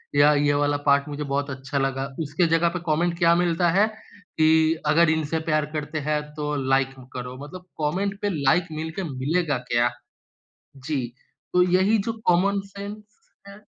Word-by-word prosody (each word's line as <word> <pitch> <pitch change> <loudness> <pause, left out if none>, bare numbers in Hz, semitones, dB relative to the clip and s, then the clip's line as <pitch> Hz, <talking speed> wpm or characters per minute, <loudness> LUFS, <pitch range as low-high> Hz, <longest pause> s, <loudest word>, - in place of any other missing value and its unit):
या 145 +1 +6
ये 145 0 +2
वाला 145 0 +1
पार्ट 140 0 +3
मुझे 145 +1 -4
बहुत 140 0 -2
अच्छा 135 +1 -5
लगा। 135 0 -1
उसके 160 +3 0
जगह 165 +1 +3
पे 180 +1 -4
कॉमेंट 170 +2 0
क्या 170 -1 +4
मिलता 175 0 +2
है? 200 +4 +4 0.5
कि 160 0 +4
अगर 160 +2 +4
इनसे 160 0 0
प्यार 155 -1 +2
करते 150 +1 -3
हैं 150 -1 +1
तो 150 -1 -2
लाइक 135 0 +3 0.2
करो 125 0 -6
मतलब 180 +5 -10
कॉमेंट 195 +7 -1
पे 205 - 0
लाइक 165 +6 +3
मिलके 160 +4 -4
मिलेगा 145 +1 -1
क्या? 120 0 +3 0.9
जी। 135 -2 -3 0.5
तो 180 - +4
यही 190 +4 +3
जो 230 - 0
कॉमन 195 +3 +3
सेंस 205 +1 -7 0.4
है 200 +1 -12
155 Hz, 165 wpm, -24 LUFS, 145-175 Hz, 0.9 s, या